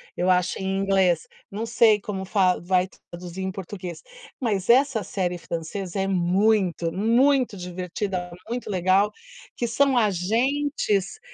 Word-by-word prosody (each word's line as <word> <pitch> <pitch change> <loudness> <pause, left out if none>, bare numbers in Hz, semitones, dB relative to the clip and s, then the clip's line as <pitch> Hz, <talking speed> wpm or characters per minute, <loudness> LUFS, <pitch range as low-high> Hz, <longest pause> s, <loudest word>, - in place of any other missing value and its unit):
eu 180 +1 0
acho, 180 -1 +2
em 190 0 -1
inglês, 190 -4 +2 0.2
não 210 +3 -3
sei 225 -2 +4
como 195 -2 -5
fa 185 -2 +2
vai 185 +1 +1 0.2
traduzir 175 +1 -7
em 190 - -2
português, 185 -3 -7 0.4
mas 205 -6 -1
essa 250 -3 +4
série 180 -1 -2
francesa 170 +3 -5
é 195 - 0
muito, 185 -1 +2
muito 240 +3 +2
divertida, 180 +1 -4 0.2
muito 240 -1 -4
legal, 190 +2 +2 0.5
que 240 - -1
são 265 +3 +2
agentes 225 - 0
195 Hz, 130 wpm, -24 LUFS, 180-220 Hz, 0.5 s, sei